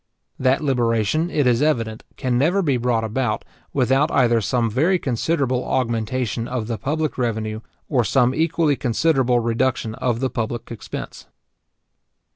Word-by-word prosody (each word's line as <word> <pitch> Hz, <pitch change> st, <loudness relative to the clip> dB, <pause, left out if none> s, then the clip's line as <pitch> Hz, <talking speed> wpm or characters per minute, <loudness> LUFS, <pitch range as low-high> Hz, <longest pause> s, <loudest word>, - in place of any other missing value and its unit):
That 130 Hz, +3 st, +2 dB
liberation, 125 Hz, +3 st, +1 dB
it 150 Hz, -5 st, +1 dB
is 125 Hz, 0 st, +3 dB
evident, 115 Hz, -8 st, 0 dB
can 125 Hz, -2 st, -1 dB
never 170 Hz, +10 st, +2 dB
be 140 Hz, -5 st, +2 dB
brought 120 Hz, -2 st, 0 dB
about, 110 Hz, 0 st, -1 dB, 0.3 s
without 135 Hz, +3 st, +2 dB
either 120 Hz, -4 st, +3 dB
some 115 Hz, +3 st, +1 dB
very 155 Hz, -, +2 dB
considerable 130 Hz, -2 st, 0 dB
augmentation 115 Hz, -1 st, -1 dB
of 125 Hz, -3 st, -3 dB
the 115 Hz, -2 st, -4 dB
public 150 Hz, +4 st, -2 dB
revenue, 110 Hz, -3 st, -1 dB, 0.3 s
or 130 Hz, -5 st, +2 dB
some 125 Hz, +3 st, +2 dB
equally 160 Hz, -1 st, +1 dB
considerable 130 Hz, -1 st, +2 dB
reduction 115 Hz, 0 st, 0 dB
of 120 Hz, 0 st, -1 dB
the 130 Hz, 0 st, -1 dB
public 120 Hz, -1 st, -4 dB
expense. 115 Hz, -, -7 dB
125 Hz, 140 wpm, -22 LUFS, 115-140 Hz, 0.3 s, is